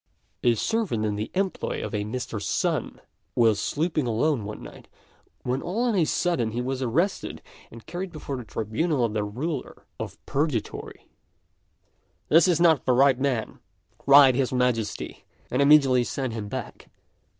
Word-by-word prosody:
A 120 -1 +4
servant 180 - -1
in 105 -1 -1
the 105 +2 -4
employ 195 0 -2
of - - -7
a 105 -1 -1
Mr. 110 -1 -4
Sun - - -1 0.3
was 110 -3 +3
sleeping 155 +2 -1
alone 120 +1 0
one 105 +1 -7
night, - - -12 0.6
when 125 +2 -1
all 205 +7 -2
on 245 -2 +1
a 175 -4 +3
sudden 150 -10 0
he 120 - -2
was 130 +1 -2
arrested 160 - -1 0.3
and 115 0 -13
carried 180 +2 -5
before 145 -4 -5
the 125 - -6
tribunal 120 - -1
of 110 - -3
the 105 -1 0
Ruler 130 +8 -5
of - - -6
Purgatory. 140 -5 -3 1.2
"This 165 +4 +6
is 175 -3 +2
not 165 -4 +4
the 130 - +3
right 135 0 +4
man," 130 -5 -1 0.4
cried 140 -1 +7
his 130 0 0
Majesty, 125 -4 -1 0.3
and 125 - +1
immediately 140 -4 +5
sent 130 -1 -3
him 110 -2 -5
back. - - -7
130 Hz, 160 wpm, -25 LUFS, 115-155 Hz, 1.2 s, cried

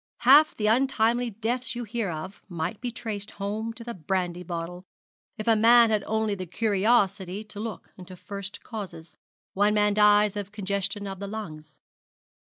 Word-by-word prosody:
Half 290 +5 +7
the 210 - -1
untimely 240 0 +2
deaths 235 +4 -2
you 240 - -3
hear 225 -2 -3
of 175 +5 -6
might 175 +4 -4
be 245 - -2
traced 220 -3 -5
home 215 +2 -4
to 230 0 -9
the 235 0 -5
brandy 180 0 -2
bottle, 175 +1 -5 0.5
if 215 - -6
a 225 - +5
man 230 +1 +6
had 215 -1 +1
only 220 -1 0
the 185 -2 -5
curiosity 200 -1 +1
to 215 -1 -11
look 220 -1 -7
into 185 0 -10
first 200 +2 -7
causes. 175 -8 -8 0.4
One 205 +2 +2
man 210 0 +3
dies 210 0 +5
of 205 -1 -5
congestion 200 0 -2
of 195 -1 -6
the 200 - -5
lungs. 155 -9 -8
210 Hz, 165 wpm, -26 LUFS, 190-225 Hz, 0.5 s, Half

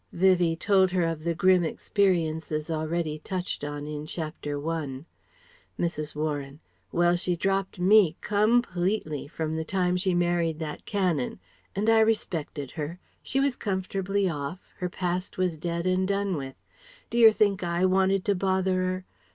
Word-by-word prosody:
Vivie 175 -2 +3
told 190 +2 +3
her 180 -1 +1
of 165 -2 -2
the 170 0 0
grim 185 0 +4
experiences 160 -4 0
already 155 0 -2
touched 180 0 -4
on 145 0 -4
in 150 0 -5
Chapter 155 -3 -4
I. 150 -4 -3 0.7
Mrs. 155 -3 -2
Warren: 145 -2 -3 0.3
"Well 175 0 +3
she 175 0 0
dropped 195 +2 -1
me 185 -2 +5
_com_pletely 205 - +1
from 160 0 -3
the 160 - -1
time 180 +1 0
she 180 0 +2
married 175 -2 +1
that 155 -2 -6
Canon. 180 - -1 0.4
And 205 +3 -1
I 225 0 +6
respected 170 - 0
her. 160 +2 -5 0.2
She 270 - -1
was 275 -2 +2
comfortably 195 -1 -1
off, 160 +2 -5
her 180 - -2
past 180 0 -3
was 180 -3 +1
dead 170 +2 -3
and 185 0 +2
done 200 -1 0
with. 135 -3 -5 0.6
D'yer 230 -1 +7
think 205 -3 +2
I 175 +1 +1
wanted 190 0 +2
to 205 - +3
bother 190 -1 +1
'er? 185 0 -2
175 Hz, 150 wpm, -27 LUFS, 160-190 Hz, 0.7 s, D'yer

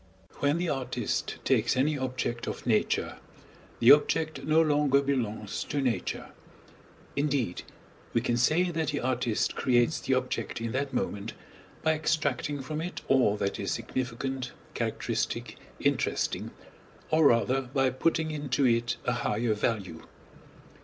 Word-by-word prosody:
When 145 +2 +2
the 175 +1 -1
artist 135 -5 -2
takes 120 -1 +2
any 150 +4 +2
object 125 -3 -3
of - - -5
Nature, 110 -4 +1 0.6
the 120 - +8
object 155 +2 +3
no 155 +1 +3
longer 145 -3 +4
belongs 115 -7 -2
to 145 - -2
Nature; 120 -8 -1 0.9
indeed, 140 -10 0 0.5
we - - +2
can 120 0 0
say 160 +9 +3
that 160 -2 -1
the - - -1
artist 125 -3 0
creates 125 +2 +2
the 130 - +1
object 130 -1 -2
in 115 0 -3
that 135 +2 -1
moment, 110 -4 -2 0.5
by 160 0 +4
extracting 150 -3 -1
from 155 +3 -4
it 175 +2 -5
all 125 -6 +4
that 100 -1 -2
is - - -2
significant, 130 +1 -3 0.2
characteristic, - - -2 0.2
interesting, - - 0 0.6
or 155 -1 +6
rather 120 +3 +3
by 135 -2 +2
putting 160 +4 0
into 145 -3 0
it 120 0 +2
a 125 - +2
higher 115 -1 0
value. 100 -6 -2
130 Hz, 135 wpm, -29 LUFS, 120-150 Hz, 0.9 s, the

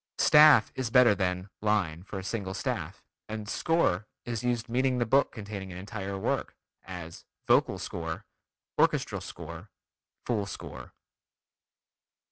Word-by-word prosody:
"Staff" 150 -1 +7
is 130 -3 -2
better 120 -2 +6
than 90 -1 -1
"line" 100 -7 +1
for 95 +1 -7
a 95 - -5
single 95 -2 -3
staff, - - -3 0.3
and 110 -1 -5
"score" 110 - +1 0.2
is 120 -2 -3
used 120 -1 0
meaning 130 +2 +1
the 120 - +1
book 135 +4 +3
containing 100 -4 -7
an 90 - -7
entire 100 0 -5
work, 95 - -2 0.3
as 85 -2 -8 0.2
"vocal - - +4
score," - - -5 0.5
"orchestral - - +2
score," 85 +4 -9 0.6
"full 105 -5 0
score." 95 - -8
105 Hz, 130 wpm, -29 LUFS, 95-120 Hz, 0.6 s, Staff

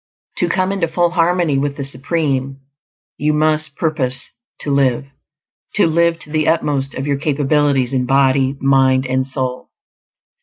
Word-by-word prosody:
To 175 - +1
come 185 +2 0
into 190 -4 0
full 170 +1 +1
harmony 170 -4 +1
with 140 0 -2
the 140 - -3
Supreme, 135 0 -2 0.6
you 150 +1 +1
must 155 -1 +1
purpose 135 -7 -2 0.3
to 145 - -2
LIVE; 135 -1 +1 0.7
to 205 - +4
live 170 +1 +2
to 150 - -8
the 155 -1 0
utmost 145 -4 0
of 135 - -4
your 140 -1 0
capabilities 140 -2 +1
in 125 -1 0
body, 135 0 +2
mind, 135 -1 +3
and 130 +1 0
soul. 130 -1 -4
140 Hz, 150 wpm, -18 LUFS, 135-160 Hz, 0.7 s, to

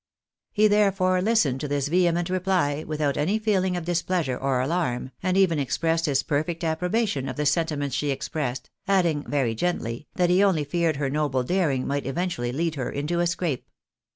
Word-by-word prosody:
261 210 - +3
He, - - +8
therefore, 195 -3 +2
listened 180 - +2
to 150 - -2
this 145 -1 -1
vehement 175 +1 +2
reply 180 -6 0
without 150 -2 -1
any 175 +9 +1
feeling 190 -4 +1
of 170 - -5
displeasure 170 -5 0
or 135 0 0
alarm, 130 -3 -1
and 185 0 +1
even 175 -5 +3
expressed 165 +4 0
his 140 -1 +1
perfect 160 +3 -2
approbation 170 - 0
of 130 - -5
the 150 - -2
sentiments 150 -2 0
she 145 - -1
expressed, 130 -2 -3 0.2
adding, 175 -7 +2
very 135 -6 +1
gently, 120 -2 -2
that 180 -1 +2
he 185 +3 +4
only 185 -7 +3
feared 165 +2 0
her 140 -1 -2
noble 140 -3 0
daring 145 -4 0
might 140 0 -2
eventually 135 -5 -2
lead 165 +5 -1
her 135 -4 -3
into 150 +5 -2
a 175 - +2
scrape. 170 -5 -2
160 Hz, 180 wpm, -25 LUFS, 140-180 Hz, 0.2 s, He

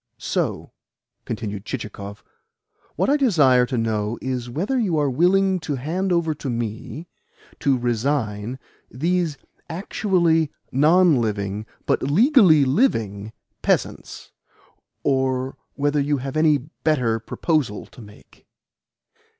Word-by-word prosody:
"So," - - -2 0.5
continued 100 -2 -4
Chichikov, 105 -4 -7 0.7
"what - - +1
I 285 +2 +3
desire 145 - +4
to 130 - -2
know 110 -1 -1
is 125 -2 -3
whether 195 - -1
you 190 -9 +1
are 145 -2 +1
willing 185 +6 +3
to 160 -3 -3
hand 170 +9 -2
over 170 -2 +1
to 140 -2 -6
me 120 +7 -4 0.5
to 135 -2 +2
resign 120 -2 -1 0.3
these 165 +2 -1 0.3
actually 170 -4 +1 0.2
non 160 +3 +5
living, 105 -1 -3 0.2
but - - +1
legally 180 - +5
living, 110 - 0 0.3
peasants; - - -2 0.7
or 130 -1 0 0.2
whether 145 +1 +1
you 145 +1 +1
have 135 +1 -5
any 155 -1 +4
better 130 -4 -1
proposal 125 -1 -1
to - - -15
make?" 105 -1 -17
140 Hz, 115 wpm, -22 LUFS, 115-165 Hz, 0.7 s, non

